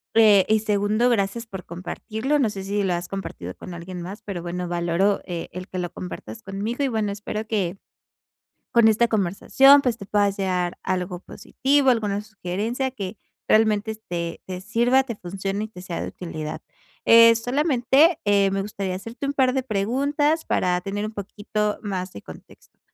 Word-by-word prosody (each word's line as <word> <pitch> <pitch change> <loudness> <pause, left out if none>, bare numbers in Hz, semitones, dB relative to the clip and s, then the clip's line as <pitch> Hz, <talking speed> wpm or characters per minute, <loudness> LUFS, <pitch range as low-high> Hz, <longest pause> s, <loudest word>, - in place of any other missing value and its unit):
Eh, 210 -4 +7
y 220 0 +4
segundo, 210 +3 +1
gracias 230 +1 0
por 190 -5 -8
compartirlo, 220 - -3
no 235 -5 +2
sé 195 -2 -6
si 200 +1 -1
lo 185 -2 +1
has 175 0 -3
compartido 95 - -6
con 180 - -9
alguien 175 +1 -7
más, 190 +5 -7
pero 190 -4 -5
bueno 180 +1 -4
valoro, 175 +3 +1
eh, 175 -2 -5
el 180 +1 -7
que 185 - -5
lo 175 -1 -3
compartas 195 +4 -8
conmigo, 210 +8 -3
y - - +2
bueno 215 -3 -1
espero 210 +1 -5
que, 195 -4 -1 1.0
con 235 -2 +6
esta 230 +2 +4
conversación, 225 +8 +5
pues, 245 -4 0
te 200 - -9
puedas 200 -1 +1
llevar 180 -2 -1
algo 180 -1 -2
positivo, 270 +6 +1
alguna 205 -3 0
sugerencia 215 +5 -3
que 200 -4 -6 0.3
realmente 220 0 +3
te 170 -1 -3
te 185 -1 -5
sirva, 240 +5 +3
te 235 -4 -5
funcione, 195 +3 -4
y - - -8
te 180 -4 -11
sea 175 -2 -5
de - - -3
utilidad. 155 -3 -6 0.4
Eh, 230 0 +8
solamente, 275 +5 +3
eh, 200 -1 +3
me 195 0 0
gustaría 195 -2 -4
hacerte 230 +8 -6
un 285 - -1
par 260 -2 +3
de 265 - +1
preguntas 280 +9 0
para 180 -1 +1
tener 200 +3 -3
un 215 - -4
poquito 210 +1 -3
más 190 -3 -4
de - - -9
contexto. - - -15
205 Hz, 180 wpm, -24 LUFS, 185-230 Hz, 1.0 s, Eh